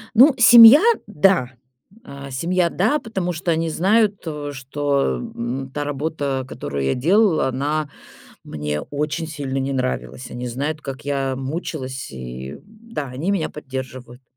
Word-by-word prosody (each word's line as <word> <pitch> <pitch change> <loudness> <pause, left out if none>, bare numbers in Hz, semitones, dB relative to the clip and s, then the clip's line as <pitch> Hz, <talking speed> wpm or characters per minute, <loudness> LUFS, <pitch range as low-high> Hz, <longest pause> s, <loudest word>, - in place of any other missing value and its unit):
Ну, 265 +6 +7
семья, 235 +3 +9 0.3
да, 185 -8 +2 0.5
а, 140 - -10
семья, 170 +6 0
да, 220 - +1
потому 190 -8 -3
что 170 +1 -2
они 165 0 0
знают, 200 +5 +1
о, 150 -2 -4
что, 140 - -1
м, 125 - -5
та 145 - -2
работа, 145 -2 -3
которую 70 - -5
я 65 - +1
делала, 175 - +3
она 145 +3 -2 0.6
мне 75 0 -4
очень 150 +3 -3
сильно 140 -4 -4
не 135 +1 -2
нравилась. 130 -1 -3
Они 125 +1 -6
знают, 145 +6 -3
как 135 -3 -7
я 135 -2 -1
мучилась, 135 -1 -5
и, 65 0 -7
м, - - -11
да, 220 -7 -7
они 135 +9 -3
меня 195 -6 0
поддерживают. 130 -3 -8
145 Hz, 145 wpm, -21 LUFS, 130-175 Hz, 0.6 s, семья